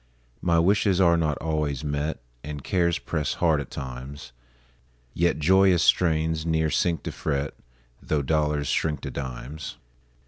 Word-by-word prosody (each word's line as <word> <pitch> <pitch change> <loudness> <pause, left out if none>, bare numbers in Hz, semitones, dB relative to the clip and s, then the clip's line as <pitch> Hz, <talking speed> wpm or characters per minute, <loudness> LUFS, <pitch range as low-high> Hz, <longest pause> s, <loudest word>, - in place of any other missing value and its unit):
My 85 -1 +2
wishes 95 +2 +3
are 85 -3 +5
not 80 -3 0
always 75 -4 -2
met, 75 -2 -2 0.2
And 75 -1 -6
cares 85 -3 +1
press 75 -4 -2
hard 80 -4 +2
at - - -8
times; 65 +1 -7 0.8
Yet 85 +1 +1
joyous 95 +2 +4
strains 80 -2 +2
ne'er 80 -1 +1
sink 85 +2 +1
to - - -4
fret, 70 -2 -2 0.5
Tho' 75 -2 -1
dollars 75 0 0
shrink 75 +1 0
to - - -5
dimes. 70 +3 -6
80 Hz, 140 wpm, -25 LUFS, 70-85 Hz, 0.8 s, are